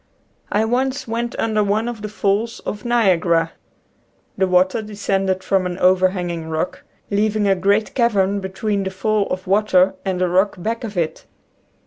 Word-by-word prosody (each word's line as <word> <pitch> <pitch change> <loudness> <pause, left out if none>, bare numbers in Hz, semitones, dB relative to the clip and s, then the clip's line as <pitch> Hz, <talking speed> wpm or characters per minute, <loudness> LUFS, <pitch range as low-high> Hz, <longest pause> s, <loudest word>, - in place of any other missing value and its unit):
I 215 +2 +2
once 260 +4 -1
went 235 +1 -3
under 215 -2 +1
one 210 +3 0
of 235 -3 -5
the 210 - -5
falls 210 +2 -1
of 210 - -5
Niagara. 180 -8 +2 0.8
The 190 0 +1
water 185 +4 +2
descended 195 -3 -1
from 190 -2 +1
an 180 0 -5
over 185 0 +4
hanging 175 -3 -4
rock, 160 +3 -3 0.3
leaving 210 0 +1
a 195 - +5
great 200 +3 +1
cavern 205 -5 +2
between 200 +2 -2
the 190 - -2
fall 200 +2 0
of 185 0 -4
water 190 -1 +3
and 190 -2 -2
the 180 - +2
rock 190 +3 +2
back 225 +6 -3
of 210 -4 -6
it. 160 -2 -2
200 Hz, 165 wpm, -20 LUFS, 185-215 Hz, 0.8 s, a